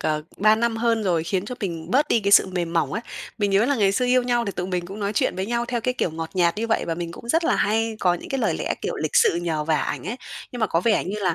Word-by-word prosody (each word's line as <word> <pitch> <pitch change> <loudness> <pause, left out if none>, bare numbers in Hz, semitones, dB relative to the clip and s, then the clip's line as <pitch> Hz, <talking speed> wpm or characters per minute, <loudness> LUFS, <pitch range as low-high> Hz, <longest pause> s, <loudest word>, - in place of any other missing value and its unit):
ờ, 155 0 -1
3 215 +2 +5
năm 230 +1 0
hơn 230 -1 +1
rồi, 170 -4 +1
khiến 190 +1 -1
cho 250 - -5
mình 170 -4 -4
bớt 290 +6 +3
đi 230 - +3
cái 200 -1 0
sự - - +7
mềm 175 -3 -3
mỏng 160 -5 0
ấy. 225 - -3 0.4
Mình 205 -2 +1
nhớ 195 +3 +4
là 285 - +2
ngày 200 -4 +3
xưa 250 - +1
yêu 250 0 +3
nhau 240 -1 +1
thì 200 - -2
tụi 180 - -4
mình 180 -2 -2
cũng 195 +3 -8
nói 200 0 -1
chuyện - - 0
với 190 - -2
nhau 235 +1 -1
theo 240 -1 -1
cái 250 +2 -1
kiểu 180 - -1
ngọt 160 0 -5
nhạt 175 -1 +2
như 225 +2 -2
vậy. 225 - +1
Và 165 - -1
mình 170 0 -5
cũng 235 - -11
rất 330 +7 +2
là - - +2
hay 225 +1 0
có 180 -2 +3
những 175 - -8
cái 270 - -2
lời 210 -8 +1
lẽ, - - -1
kiểu, - - -2
lịch 155 - -3
sự - - +5
nhờ 165 -3 -2
vả 160 0 +2
ảnh - - -3
ấy. 235 - -3 0.4
Nhưng 245 - -6
mà 220 - +3
có 165 -3 +1
vẻ 215 +3 +2
như 195 +3 -4
là 185 -5 0
200 Hz, 325 wpm, -23 LUFS, 175-230 Hz, 0.4 s, sự